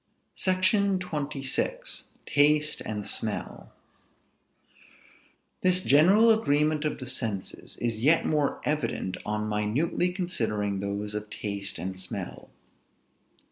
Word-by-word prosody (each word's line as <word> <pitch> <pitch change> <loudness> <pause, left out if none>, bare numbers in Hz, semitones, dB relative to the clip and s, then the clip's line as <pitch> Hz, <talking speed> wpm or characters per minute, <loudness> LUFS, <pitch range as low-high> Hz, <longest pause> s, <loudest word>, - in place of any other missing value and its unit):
SECTION 190 +1 +2
XXVI. 155 - -3 0.2
TASTE 150 +1 +3
AND 105 -2 -4
SMELL. - - -2 1.9
This 185 0 +2
general 195 +11 +6
agreement 150 -7 +2
of 150 - -1
the 130 - -7
senses 115 -7 -4
is 115 -2 -2
yet 150 +8 +4
more 150 -2 +1
evident 115 -10 -1
on 105 0 -1
minutely 110 +12 0
considering 110 - -1
those 100 +1 -3
of 105 0 -5
taste 100 -2 -4
and 95 +1 -4
smell. 95 -1 -6
145 Hz, 100 wpm, -27 LUFS, 105-175 Hz, 1.9 s, general